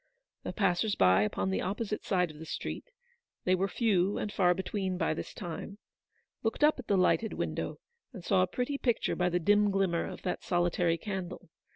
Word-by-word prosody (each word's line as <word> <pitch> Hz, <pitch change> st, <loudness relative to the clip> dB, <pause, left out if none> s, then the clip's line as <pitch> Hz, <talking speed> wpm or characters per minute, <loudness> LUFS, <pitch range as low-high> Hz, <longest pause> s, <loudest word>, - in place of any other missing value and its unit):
The -, -, -4 dB
passers 195 Hz, +2 st, +1 dB
by 95 Hz, +1 st, +5 dB
upon 95 Hz, -2 st, 0 dB
the 95 Hz, -, 0 dB
opposite 210 Hz, +2 st, -3 dB
side 180 Hz, -4 st, +1 dB
of 150 Hz, -, -14 dB
the 160 Hz, -, -8 dB
street -, -, -5 dB, 0.3 s
— -, -, -54 dB
they 185 Hz, -, +3 dB
were 185 Hz, +1 st, +2 dB
few 200 Hz, -3 st, +1 dB
and 210 Hz, -, -3 dB
far 180 Hz, -2 st, +3 dB
between 190 Hz, 0 st, -2 dB
by -, -, +1 dB
this -, -, -6 dB
time 185 Hz, +2 st, -7 dB, 0.3 s
— -, -, -45 dB
looked 225 Hz, +6 st, -1 dB
up 300 Hz, -2 st, +5 dB
at 255 Hz, -, -8 dB
the 200 Hz, -, +3 dB
lighted 205 Hz, +4 st, +2 dB
window, -, -, -3 dB, 0.3 s
and 190 Hz, -9 st, -10 dB
saw 190 Hz, -2 st, +3 dB
a 185 Hz, -, +3 dB
pretty 250 Hz, +8 st, -2 dB
picture 240 Hz, -3 st, +1 dB
by 180 Hz, 0 st, +1 dB
the 175 Hz, -, +1 dB
dim 205 Hz, +4 st, +4 dB
glimmer 195 Hz, -4 st, +1 dB
of -, -, -8 dB
that 180 Hz, -, -2 dB
soli 175 Hz, -1 st, +1 dB
tary 170 Hz, -1 st, +1 dB
candle. 185 Hz, -4 st, -6 dB
190 Hz, 210 wpm, -30 LUFS, 175-210 Hz, 0.3 s, by